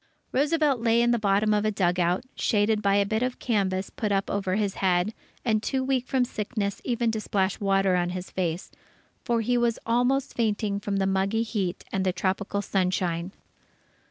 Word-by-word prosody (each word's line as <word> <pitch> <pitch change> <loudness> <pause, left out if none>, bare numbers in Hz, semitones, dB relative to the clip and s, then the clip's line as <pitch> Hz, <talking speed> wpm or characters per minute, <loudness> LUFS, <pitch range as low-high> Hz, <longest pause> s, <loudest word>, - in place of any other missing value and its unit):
Roosevelt 295 -1 +2
lay 230 0 +3
in 240 0 +3
the 235 - +2
bottom 210 +1 +2
of 210 0 +2
a 215 - +2
dugout, 180 -2 +1
shaded 210 0 +1
by 200 -1 +2
a 200 0 +3
bit 220 +3 -1
of 255 0 -1
canvas 195 -5 -1
put 210 -2 -2
up 195 -1 0
over 195 -2 -1
his 205 -2 0
head, 185 +2 +2 0.3
and 215 -3 +2
too 260 +3 -1
weak 260 -1 0
from 260 -2 +2
sickness 210 -3 -3
even 235 -2 0
to 220 -1 -3
splash 195 -2 0
water 195 -2 +2
on 175 -1 +1
his 180 0 -6
face; 175 -1 -2 0.5
for 235 -2 +1
he 245 +2 +1
was 235 -1 +1
almost 245 +4 +1
fainting 210 -3 0
from 205 0 -3
the 195 - +1
muggy 195 +4 +1
heat 200 -6 -3
and 190 - 0
the 185 - +2
tropical 200 +2 -1
sunshine. 180 -2 -1
205 Hz, 185 wpm, -26 LUFS, 190-230 Hz, 0.5 s, lay